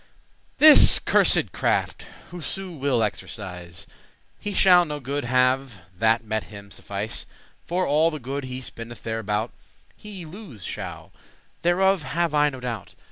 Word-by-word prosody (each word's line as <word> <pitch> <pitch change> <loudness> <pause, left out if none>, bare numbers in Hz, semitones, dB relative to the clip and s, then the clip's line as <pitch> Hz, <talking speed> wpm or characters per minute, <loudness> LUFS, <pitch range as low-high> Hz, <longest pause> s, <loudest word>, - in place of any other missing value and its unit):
This 310 0 +9
cursed - - +3
craft - - -1 0.2
whoso 180 +3 -5
will 135 -7 0
exercise, 90 -5 -6 0.5
He 205 - -5
shall 180 -3 +5
no 150 -3 -5
good 140 0 -4
have 125 -1 +1 0.2
that 110 +3 +2
him 105 -2 -6
may - - -13
suffice; 100 +2 -5 0.4
For 180 +2 0
all 155 +3 +3
the 155 - -6
good 135 +1 -5
he 130 0 -6
spendeth 120 -2 -9
thereabout, 110 0 -3 0.4
He 200 -5 -10
lose 160 - -11
shall, - - -7 0.5
thereof 190 +2 +2
have 165 +1 -2
I 150 0 +3
no 130 -2 -9
doubt. 120 -6 -6
130 Hz, 135 wpm, -24 LUFS, 110-170 Hz, 0.5 s, This